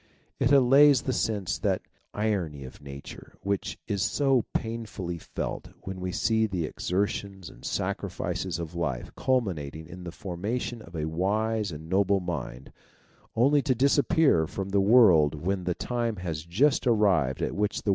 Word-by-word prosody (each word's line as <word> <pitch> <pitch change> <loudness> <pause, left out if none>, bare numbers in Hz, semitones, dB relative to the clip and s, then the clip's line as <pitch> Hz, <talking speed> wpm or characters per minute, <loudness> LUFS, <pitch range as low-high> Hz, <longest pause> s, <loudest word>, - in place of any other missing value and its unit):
It 130 - +2
allays 140 0 +6
the 130 - -1
sense 100 -11 -1
of - - -23
that - - 0 0.3
irony 95 -10 -2
of 65 - -11
Nature 70 -1 -10
which 100 -1 -2
is 100 -2 -1
so 130 +3 +2
pain 115 0 -3
fully 90 -4 -5
felt - - -5
when 95 -1 -6
we 90 0 -3
see 110 +3 +1
the 90 -5 -2
exertions 95 +1 -3
and - - -17
sacrifices 90 -3 -2
of 85 -2 -6
a 85 - -5
life 65 -8 -2
culminating 85 - -1
in 90 +2 -10
the 85 - -6
formation 105 +7 -4
of 85 -4 -12
a 75 -1 -2
wise 105 +5 0
and 80 +1 -8
noble 100 +2 +2
mind, 80 -8 -5 0.6
only 140 +5 +4
to 130 -2 +1
disappear 140 - +3
from 95 +3 -5
the 100 0 +2
world 95 -9 +6
when 90 +4 -2
the 90 -1 0
time 120 -2 -2
has 85 -5 -5
just 130 +10 +2
arrived 95 - +2
at - - -1
which 105 0 -1
the - - -1
95 Hz, 165 wpm, -27 LUFS, 85-115 Hz, 0.6 s, allays